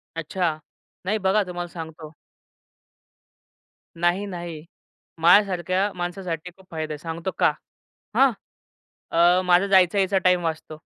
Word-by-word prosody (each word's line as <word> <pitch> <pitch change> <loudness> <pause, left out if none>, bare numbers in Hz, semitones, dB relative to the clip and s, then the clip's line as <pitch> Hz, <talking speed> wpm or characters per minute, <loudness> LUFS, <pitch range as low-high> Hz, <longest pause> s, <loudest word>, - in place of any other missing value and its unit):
अच्छा. 165 0 -1 0.5
नाही 205 +4 +1
बघा 205 +2 +3
तुम्हाला 175 -1 -5
सांगतो 160 -2 -9 1.9
नाही, 175 +4 +1
नाही. 170 -5 -7 0.6
माझ्या 175 +5 +7
सारख्या 185 +1 -1
माणसासाठी 175 -1 -4
खूप 190 - -19
फायदा 155 -1 -4
आहे - - -6
सांगतो 165 +4 -5
का? - - +5 0.6
हां. 270 -1 +5 0.8
अ, 175 +2 +4
माझा 180 +2 +4
जायचा 190 -1 +4
यायचा 195 0 +2
टाईम 180 -1 +3
वाचतो. 160 -1 -4
175 Hz, 120 wpm, -24 LUFS, 165-190 Hz, 1.9 s, माझ्या